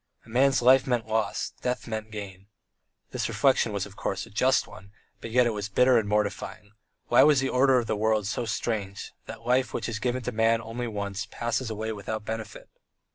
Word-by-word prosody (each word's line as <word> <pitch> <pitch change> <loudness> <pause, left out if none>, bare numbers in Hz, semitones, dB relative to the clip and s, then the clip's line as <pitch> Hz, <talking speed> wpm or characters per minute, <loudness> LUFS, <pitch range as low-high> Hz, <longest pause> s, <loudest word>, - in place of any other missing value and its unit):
A - - -17
man's 130 +2 +3
life 130 +2 +6
meant 120 -3 0
loss: 110 0 -1
death 125 0 -2
meant 110 -1 -4
gain. 100 -3 -8 0.6
This - - -2
reflection 130 -4 +2
was, 100 -2 -2
of 100 -1 -13
course, 95 -1 -3
a - - -16
just 130 +5 +2
one, 100 -1 -13 0.3
but - - -7
yet 125 +2 +4
it 120 - +1
was 105 -1 -4
bitter 125 +4 +4
and 105 -2 -3
mortifying; 105 -1 -2 0.4
why 120 - +6
was 150 -2 +6
the 135 0 0
order 130 0 +4
of 120 - +1
the 110 - -1
world 110 0 +1
so 105 +4 -2
strange, 105 -3 -3
that 115 - -9
life, 130 +2 +1
which - - -2
is 115 -2 -3
given 125 +3 -1
to 125 - -2
man 115 0 +2
only 115 +2 -5
once, 100 -1 -4
passes 120 +1 -2
away 110 0 -3
without 110 +1 -5
benefit? 110 -2 -6
110 Hz, 205 wpm, -27 LUFS, 105-125 Hz, 0.6 s, life